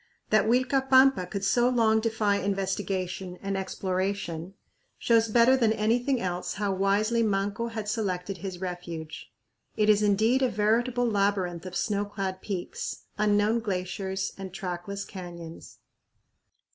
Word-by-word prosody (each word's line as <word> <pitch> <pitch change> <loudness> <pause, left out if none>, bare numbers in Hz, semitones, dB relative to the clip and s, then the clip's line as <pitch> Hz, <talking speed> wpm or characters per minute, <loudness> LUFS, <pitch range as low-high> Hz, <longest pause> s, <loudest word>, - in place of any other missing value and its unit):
That 215 0 +4
Uilcapampa 260 -3 +4
could 200 -2 -4
so 240 +4 +3
long 225 -3 +3
defy 220 -2 +1
investigation 190 -2 -2
and 195 0 -3
exploration 185 -2 -3 0.4
shows 230 -1 +3
better 235 +4 +5
than 230 -4 +3
anything 240 +5 +1
else 180 -2 -3
how 205 -1 -1
wisely 205 +4 +2
Manco 205 +1 0
had 220 -2 -5
selected 195 -4 -2
his 190 -1 -6
refuge. 175 -3 -6 0.5
It 215 0 +3
is 210 0 +5
indeed 215 +5 +3
a 260 - +3
veritable 235 +4 +1
labyrinth 195 -5 0
of 185 - -8
snow 205 -2 0
clad 195 -2 -4
peaks, 190 -4 -5 0.2
unknown 210 +2 +3
glaciers, 190 -2 -3
and 190 -1 -6
trackless 185 +2 -5
canyons. 170 -3 -9
200 Hz, 130 wpm, -27 LUFS, 185-225 Hz, 0.5 s, better